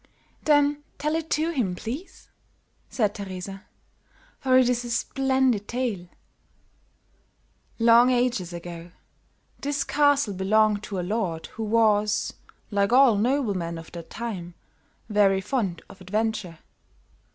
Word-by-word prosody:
"Then 290 -1 +3
tell 300 +1 -1
it 320 0 -2
to 315 +3 +1
him, 225 - -1
please," 260 - -8 0.6
said 210 -5 0
Teresa, 195 -1 -7 0.7
"for 260 -2 +3
it 255 -1 +5
is 245 -1 0
a 240 - -6
splendid 260 -3 +1
tale." 235 -8 -3 1.7
"Long 235 +2 +6
ages 245 -8 0
ago, 170 0 -8 0.7
this 280 0 -1
castle 285 -7 +2
belonged 205 +2 +2
to 195 -3 -4
a 175 - -3
lord 185 -6 -2
who - - -7
was, 215 -1 +2 0.4
like 200 0 +1
all 255 -2 +6
noblemen 205 -8 0
of 165 -1 -10
that 170 -1 -9
time, 185 -7 -6 0.5
very 205 -3 +3
fond 190 -5 -2
of 195 - -15
adventure. 210 -2 -2
220 Hz, 120 wpm, -25 LUFS, 190-255 Hz, 1.7 s, Long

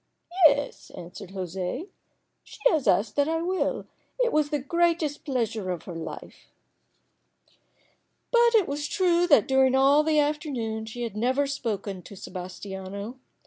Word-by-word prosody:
"Yes," 285 -1 -2
answered 175 +2 -9
José. 190 - -4 0.6
"She - - -14
has 310 -5 0
asked 205 +3 +2
that 285 +1 +3
I 325 0 0
will. 370 +2 -1 0.3
It - - +2
was 305 -1 +2
the 295 - 0
greatest 325 +1 0
pleasure 230 -8 -2
of 180 -2 -3
her 180 - -8
life." 165 -1 -8 1.8
But 475 -1 +5
it 420 -5 +4
was 290 +1 -3
true 355 -2 +2
that 285 - +5
during 265 -1 +4
all 275 +3 +5
the 310 0 +1
afternoon 275 -8 -1
she 240 +2 -6
had 230 -3 -5
never 255 +6 +1
once 280 0 -1
spoken 205 -7 -4
to 200 - -12
Sebas 185 -1 -8
tiano. 200 +5 -7
265 Hz, 150 wpm, -26 LUFS, 200-305 Hz, 1.8 s, But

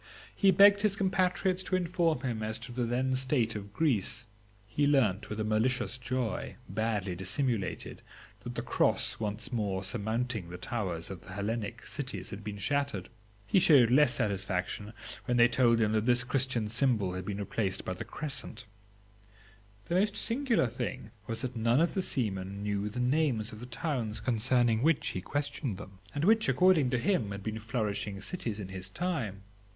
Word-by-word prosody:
He 195 - +4
begged 200 +2 +7
his 210 -2 +2
compatriots 185 -1 +1
to 185 - -1
inform 170 -5 +1
him 120 -5 -2
as 110 0 -2
to - - -9
the 120 0 -1
then 130 +2 0
state 130 -3 +1
of 100 -1 -6
Greece. 120 - 0 0.4
He 145 +7 +1
learnt 110 -8 +2
with 105 - -4
a - - 0
malicious 115 +3 0
joy, 125 -2 -2
badly 105 -5 -1
dissimulated, 100 +4 -2 0.4
that - - -7
the - - -3
Cross - - +2
once 105 0 -3
surmounting 110 0 -1
the 90 - -7
towers 90 -5 -3
of 90 -4 -7
the 95 - -11
Hellenic 110 +2 -3
cities 140 -3 -5
had 100 +1 -7
been 105 0 -5
shattered; 140 -3 -1 0.4
he 190 - +4
showed 135 -9 +6
less 135 -1 +5
satisfaction 100 -2 -2 0.3
when 125 - +1
they 120 0 +7
told 120 -1 +3
him 110 -1 +2
that 110 +1 +1
this 120 0 +4
Christian 125 -3 +1
symbol 115 -5 +1
had 95 0 -4
been 100 +1 -4
replaced 100 -1 -2
by 95 - -2
the - - -6
Crescent. 135 -5 -3 1.2
The - - -4
most 205 +3 +2
singular 240 - +2
thing 115 - -4 0.2
was 115 +2 -2
that 130 0 -3
none 115 +3 +3
of 170 +1 +2
the 190 - 0
seamen 100 - -2
knew 105 0 -1
the 110 - -5
names 125 -4 +1
of 105 - -9
the 125 - -8
towns 120 -4 -2
concerning 120 -1 +2
which 160 +2 +2
he 90 - -4
questioned 140 - -3
them, 95 -1 -11 0.2
and 145 +3 0
which, 220 +1 +4
according 180 -8 +4
to 125 - +1
him, 120 - +1
had 100 0 -6
been 110 +1 -3
flourishing 105 -3 -2
cities 110 - -4
in 95 -2 -6
his 95 0 -5
time. 115 - -3
115 Hz, 175 wpm, -30 LUFS, 105-140 Hz, 1.2 s, begged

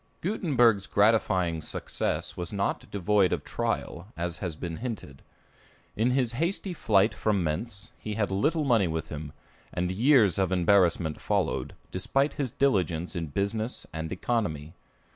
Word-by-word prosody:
Gutenberg's 120 - +2
gratifying 95 -6 +2
success - - -2
was 90 -1 -4
not 100 -1 -2
devoid 100 -1 +2
of - - -1
trial, 85 +4 -3
as 85 0 -3
has 90 -3 -4
been 80 0 -5
hinted. 110 - -6 0.7
In 115 +3 +2
his 125 -2 +1
hasty 170 +8 -2
flight 105 - +3
from 100 -4 0
Mentz, 100 +7 -3
he 105 -1 -5
had 105 -2 0
little 150 - +1
money 115 -9 +3
with 80 -1 -3
him, 75 -1 -6 0.4
and 90 +1 -1
years 110 - +4
of 95 -1 +1
embarrassment 90 -3 +3
followed, 65 - -1 0.2
despite 135 +10 0
his 140 -3 -2
diligence 90 - 0
in 85 -2 -2
business 105 - -2
and 80 0 -4
economy. 90 -7 -2
100 Hz, 145 wpm, -28 LUFS, 85-115 Hz, 0.7 s, years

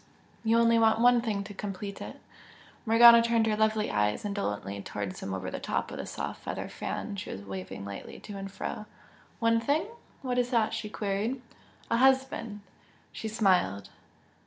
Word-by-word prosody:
You 225 0 +3
only 230 0 +5
want 225 0 +4
one 245 0 +5
thing 210 -4 -2
to 205 +1 -9
complete 200 0 -6
it!" - - -8 0.7
Morgana 235 +1 +9
turned 230 -1 +2
her 215 -1 +1
lovely 215 0 +1
eyes 105 - 0
indolently 105 - -3
towards 100 -2 -5
him 95 - -5
over 95 -1 -4
the - - -4
top - - -2
of - - -6
the - - -5
soft - - -5
feather - - -4
fan 205 -2 -5
she 185 - -6
was 100 - -6
waving 95 0 -7
lightly 100 -1 -8
to 205 - -8
and 195 0 -6
fro. 210 +2 -5 0.5
"One 230 -1 +3
thing? 285 +7 +1 0.4
What 250 -1 0
is 245 0 +1
that?" 230 -4 +2
she 210 - -4
queried. 210 +5 -2 0.5
"A 230 - +3
husband!" 260 -5 +2 0.5
She 220 - -5
smiled. 180 - +1
215 Hz, 175 wpm, -29 LUFS, 185-230 Hz, 0.7 s, Morgana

